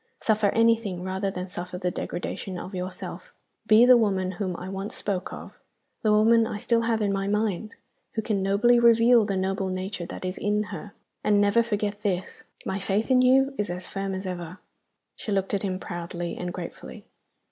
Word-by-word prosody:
"Suffer 215 -2 +2
anything 225 -4 +2
rather 190 +1 -2
than 185 -1 -5
suffer 180 0 -6
the 180 -1 -1
degradation 185 +1 -4
of 185 +3 -7
yourself. 185 0 -6 0.4
Be 220 +2 +7
the 250 0 +8
woman 190 -5 +1
whom 185 -1 -3
I 180 - -7
once 195 +2 -5
spoke 195 -3 -2
of - - -10 0.4
the 215 - +2
woman 225 +2 +5
I 215 - -4
still 230 +2 +1
have 225 -1 0
in 200 -1 +1
my 195 0 -1
mind 210 0 -1 0.4
who 220 - -1
can 205 -3 0
nobly 210 +5 +4
reveal 235 -1 +6
the 200 -2 -1
noble 190 0 -1
nature 185 -1 -4
that 185 - -7
is 185 0 -4
in 210 +1 +1
her. 195 +2 -7 0.3
And 205 -1 +3
never 205 +3 +4
forget 210 -2 -2
this 185 -3 -3 0.2
my 190 - -2
faith 205 +5 -1
in 255 -1 +6
you 270 +2 +4
is 205 - 0
as 180 +1 -4
firm 195 -1 -3
as 190 +1 -5
ever!" 180 -1 -5 0.6
She 215 - -6
looked 195 0 0
at 200 - +1
him 190 -2 -2
proudly 175 -1 -5
and 180 0 -4
gratefully. 175 -1 -8
200 Hz, 190 wpm, -26 LUFS, 185-220 Hz, 0.6 s, the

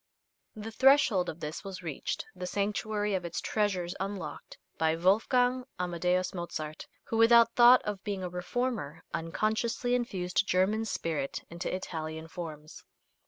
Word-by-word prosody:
The 215 +1 -7
threshold 240 -7 +4
of 160 - -7
this 150 +5 -5
was 190 -2 -7
reached, 155 -5 -4
the 180 0 -5
sanctuary 205 +1 -1
of 185 -2 -1
its 170 -1 -3
treasures 190 -5 -1
unlocked, 190 -6 -5 0.2
by 160 0 +2
Wolfgang 245 +8 +3 0.2
Amadeus 180 +1 0
Mozart, 155 -4 -5 0.2
who, 225 - -3
without 230 0 +6
thought 245 +1 +7
of 205 -2 -4
being 200 -3 -3
a 180 - -3
reformer, 180 - -3
unconsciously 215 +9 -1
infused 195 -5 0
German 205 +5 +2
spirit 155 -9 -3
into 170 +2 -4
Italian 160 -3 -5
forms. 155 -3 -8
185 Hz, 135 wpm, -30 LUFS, 170-220 Hz, 0.2 s, thought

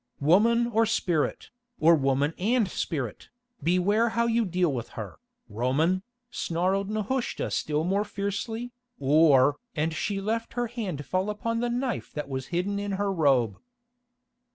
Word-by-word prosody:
"Woman 220 +11 +4
or 225 -1 +2
spirit, 175 -8 -1 0.3
or 165 +2 +6
woman 140 0 +2
and 220 +3 +2
spirit, 140 - -4 0.3
beware 200 +7 +2
how 235 +1 +1
you 230 0 +2
deal 180 -4 +1
with 120 -3 -4
her, 100 - -7 0.3
Roman," 135 - +1 0.3
snarled 190 +4 -1
Nehushta 215 +4 -2
still 150 0 0
more 195 +4 +1
fiercely, 215 +4 -4 0.3
"or——" 145 -1 +5 0.2
and 160 +1 0
she 195 +5 -2
let 225 +3 -2
her 245 0 0
hand 205 - -5
fall 185 +2 -1
upon 230 +2 -2
the 240 +1 0
knife 245 +1 -2
that 150 - -4
was 130 -1 -4
hidden 190 +4 -1
in 205 0 -3
her 200 0 0
robe. 135 - +2
185 Hz, 145 wpm, -27 LUFS, 150-220 Hz, 0.3 s, or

